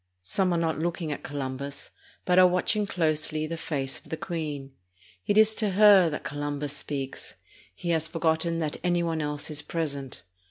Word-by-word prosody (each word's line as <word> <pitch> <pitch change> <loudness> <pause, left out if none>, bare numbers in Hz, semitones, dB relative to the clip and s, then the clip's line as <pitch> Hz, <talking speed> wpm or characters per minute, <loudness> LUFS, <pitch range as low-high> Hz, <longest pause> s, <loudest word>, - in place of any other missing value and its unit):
Some 185 - 0
are 170 - +2
not 165 -2 0
looking 170 -1 -2
at 145 - -4
Columbus, 140 0 -5 0.3
but 180 0 +4
are 185 - +8
watching 200 +4 +1
closely 155 -3 0
the 165 +2 -4
face 135 -4 -2
of - - -19
the 160 - -3
queen. 150 -5 -4 0.6
It 205 - +2
is 220 0 +6
to 210 -3 0
her 200 -3 +7
that 150 - -5
Columbus 145 0 -3
speaks; 135 -2 -5 0.4
he 170 - -3
has 160 -1 +1
forgot 160 -1 +1
ten 170 0 -1
that 155 -3 -2
any 175 -1 +2
one 165 -2 -1
else 150 +1 -3
is 150 -1 -1
present. 140 - -4
160 Hz, 185 wpm, -27 LUFS, 145-175 Hz, 0.6 s, are